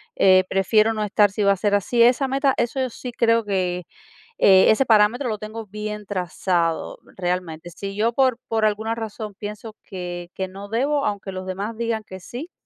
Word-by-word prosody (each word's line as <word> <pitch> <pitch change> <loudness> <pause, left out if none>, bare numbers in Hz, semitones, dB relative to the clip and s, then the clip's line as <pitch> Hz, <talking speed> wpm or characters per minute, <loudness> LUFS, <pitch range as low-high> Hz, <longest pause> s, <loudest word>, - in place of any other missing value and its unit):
eh, 185 -1 +5
prefiero 215 +4 +3
no 215 -1 -2
estar 205 -1 +3
si 210 - -3
va 200 0 +5
a - - -5
ser 205 +1 0
así. 235 +4 +1
Esa 255 +3 +4
meta, 270 0 +2
eso 240 +3 -1
yo 260 -1 0
sí 250 - -7
creo 230 -1 +2
que, 180 -4 -2 0.5
eh, 190 -1 +6
ese 260 +5 +4
parámetro 225 +4 +3
lo 215 - -2
tengo 215 +1 -7
bien 210 +1 -6
trazado 180 -3 -1 0.2
realmente. 175 -2 -3
Si 195 +3 -6
yo 230 +3 +1
por 260 -2 +2
por 220 -1 +1
alguna 215 +1 0
razón 220 -2 -6
pienso 210 +1 -8
que 175 -2 -7
que 190 - -3
no 195 +2 -10
debo, 275 +6 0
aunque 200 -2 -4
los 185 0 -6
demás 200 +4 -4
digan 230 -2 -2
que 190 -2 -10
sí, 255 - -8
210 Hz, 195 wpm, -22 LUFS, 190-230 Hz, 0.5 s, eh